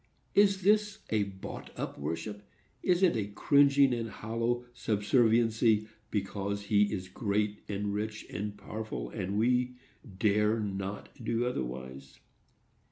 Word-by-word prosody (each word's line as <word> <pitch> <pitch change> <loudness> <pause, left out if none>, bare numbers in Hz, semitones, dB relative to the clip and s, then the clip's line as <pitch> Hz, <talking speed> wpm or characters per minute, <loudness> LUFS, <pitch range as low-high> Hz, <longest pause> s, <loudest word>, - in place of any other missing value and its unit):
Is 195 -2 +4
this 210 +1 +3
a 105 -2 +2
bought 95 -1 -8
up - - -4
worship?—is 105 - -3
it 175 -8 +5
a 105 -3 -1
cringing 140 +5 +4
and 115 -1 -2
hollow 115 +3 -2
subserviency, 115 -1 +3 0.2
because 100 0 -2
he 105 0 +3
is 95 -3 -3
great 105 +1 -1
and 100 0 -2
rich 110 +1 -3
and 105 0 -4
powerful, 110 +1 -5
and 100 -1 -3
we 125 +2 +2 0.4
dare 105 +2 +3
not 100 -1 -4
do 115 +1 0
otherwise? 65 - -5
105 Hz, 120 wpm, -31 LUFS, 100-120 Hz, 0.4 s, it